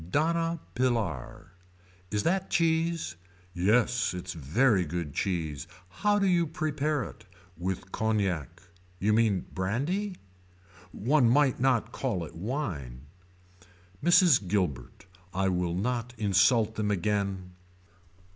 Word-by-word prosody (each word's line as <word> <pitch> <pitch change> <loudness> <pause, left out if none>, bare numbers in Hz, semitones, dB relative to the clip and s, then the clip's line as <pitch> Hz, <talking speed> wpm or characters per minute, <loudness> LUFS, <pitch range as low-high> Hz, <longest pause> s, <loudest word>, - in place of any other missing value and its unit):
Donna 165 - +1
Pilar. 115 - -2 0.6
Is 105 +1 -1
that 190 +2 0
cheese. 165 - +1 0.4
Yes 110 +4 +2
it's 90 0 -5
very 90 - +2
good 85 -2 -4
cheese. 80 -6 -2 0.2
How 205 - +1
do 200 - +2
you 175 -3 +3
prepare 150 -2 -1
it. 110 - -11 0.3
With 95 +1 -4
cognac. 95 -6 -1 0.3
You 105 +4 +1
mean 110 -4 +2
brandy. 145 - -1 0.8
One 125 +4 +3
might 140 +1 +3
not 125 -3 +2
call 105 -12 -2
it - - -12
wine. 85 - -4 1.0
Mrs. 175 - +5
Gilbert. 90 -4 -2 0.3
I 95 0 +2
will 90 -2 -1
not 120 +4 -2
insult 105 +2 +3
them 105 -1 -1
again. 100 -1 -1
105 Hz, 110 wpm, -28 LUFS, 90-140 Hz, 1.0 s, Mrs